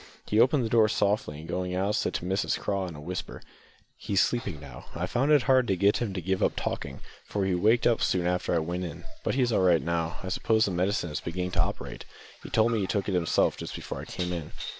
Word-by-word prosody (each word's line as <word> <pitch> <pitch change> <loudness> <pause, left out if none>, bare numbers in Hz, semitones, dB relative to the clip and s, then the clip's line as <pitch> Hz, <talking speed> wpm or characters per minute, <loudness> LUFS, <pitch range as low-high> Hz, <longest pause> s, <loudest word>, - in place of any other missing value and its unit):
He 105 - +1
opened 130 +1 +4
the - - -2
door 110 -2 +4
softly, 100 -8 0
and 80 - -9
going 90 0 -2
out, 100 +3 0
said 110 - -1
to - - -3
Mrs 95 +3 0
Craw 100 -2 -1
in 85 - -8
a - - -9
whisper 90 +5 -5 0.6
"He's 100 -2 -1
sleeping 100 -10 0
now. 70 -4 -11
I 85 - -1
found 130 +9 +1
it 145 -4 +5
hard 130 +1 +4
to 95 - +2
get 100 +3 +3
him 115 -4 -2
to 90 - -2
give 95 +2 -1
up - - +2
talking, - - -4 0.2
for 100 -2 -2
he 95 - +1
waked 110 +7 +3
up 120 - +3
soon 90 -2 +1
after 90 0 0
I - - +3
went 85 +3 -2
in; 85 - -6 0.2
but - - 0
he's 125 -3 +2
all 105 - +2
right 90 -3 +5
now. 85 +1 -1
I 95 - -4
suppose 110 +3 +2
the 100 - -1
medicine 90 -1 0
is 75 - -3
beginning 90 +2 -3
to - - +2
operate; - - -4 0.4
he - - -9
told 110 +1 +3
me 115 - +1
he 95 - -1
took 100 0 -1
it - - -1
himself 90 -2 +2
just - - -6
before - - -6
I - - -8
came 90 -1 -3
in." 80 -3 -6
95 Hz, 255 wpm, -28 LUFS, 90-110 Hz, 0.6 s, it